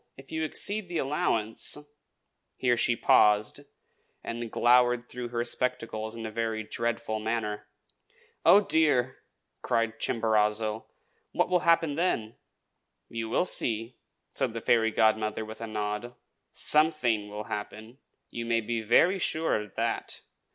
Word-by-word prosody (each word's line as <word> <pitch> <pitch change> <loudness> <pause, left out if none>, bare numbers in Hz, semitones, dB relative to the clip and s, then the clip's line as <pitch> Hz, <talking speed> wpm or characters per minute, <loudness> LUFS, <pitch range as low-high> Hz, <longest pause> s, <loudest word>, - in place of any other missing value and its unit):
If 135 0 -14
you 160 0 -2
exceed 200 +5 -2
the 175 -1 -4
allowance 115 -7 +1 0.4
" - - -52 0.3
Here 125 -1 +2
she 120 0 +2
paused, 105 +1 +3 0.6
and 115 -1 -5
glowered 125 0 +3
through 125 -1 -6
her 120 0 -2
spectacles 115 -2 -2
in 115 -1 -6
a 110 - -5
very 110 -1 -2
dreadful 115 0 -3
manner. 105 -2 -3 0.8
"Oh, 205 - +7
dear!" 145 -8 +2 0.4
cried 115 -2 -1
Chimborazo. 110 -1 0 0.5
"What - - +1
will 180 -1 +3
happen 165 -3 +3
then?" 140 -9 -1 0.7
"You 115 -1 -5
will 150 - +1
see!" 115 -6 0 0.3
said - - -2
the 115 - -5
fairy 110 -1 +3
godmother, 110 0 +1
with 110 +1 -10
a 115 - -4
nod. 105 +3 -4 0.4
"Something 150 -9 +2
will 105 +1 -6
happen, 110 +4 -7 0.3
you 120 - -5
may 115 0 0
be 115 +1 -3
very 175 - +3
sure 160 -2 0
of 105 -2 -12
that. - - -3
115 Hz, 135 wpm, -28 LUFS, 110-125 Hz, 0.8 s, Oh